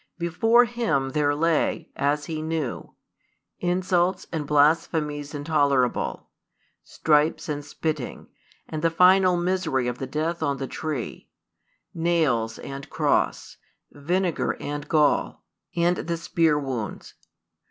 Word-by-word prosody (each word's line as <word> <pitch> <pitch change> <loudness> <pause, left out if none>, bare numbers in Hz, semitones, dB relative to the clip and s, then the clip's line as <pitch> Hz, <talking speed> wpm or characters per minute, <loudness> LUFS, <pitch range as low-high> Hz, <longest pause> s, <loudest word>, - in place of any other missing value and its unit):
Before 225 +8 +3
Him 230 - -1
there 145 0 +1
lay, 165 +1 0
as 145 +1 0
He 155 0 -4
knew, 160 -5 -4 0.6
insults 180 0 +1
and 150 -3 -3
blasphemies 150 0 +1
intolerable, 145 -4 0 0.6
stripes 150 0 +1
and 145 -2 -3
spitting, 150 -2 -4 0.4
and 155 -1 -5
the 165 - +3
final 180 +2 +5
misery 175 -8 0
of 125 0 -3
the 135 - -4
death 155 +5 -2
on 140 -3 0
the 135 - -3
tree; 145 -3 -5 0.6
nails 155 -10 +1
and 140 +1 -8
cross, - - 0 0.3
vinegar 175 +4 -1
and 145 0 -5
gall, 150 -3 +2 0.3
and 175 +1 +2
the 170 0 -3
spear 165 -2 +2
wounds. 130 -6 -5
155 Hz, 115 wpm, -25 LUFS, 145-170 Hz, 0.6 s, final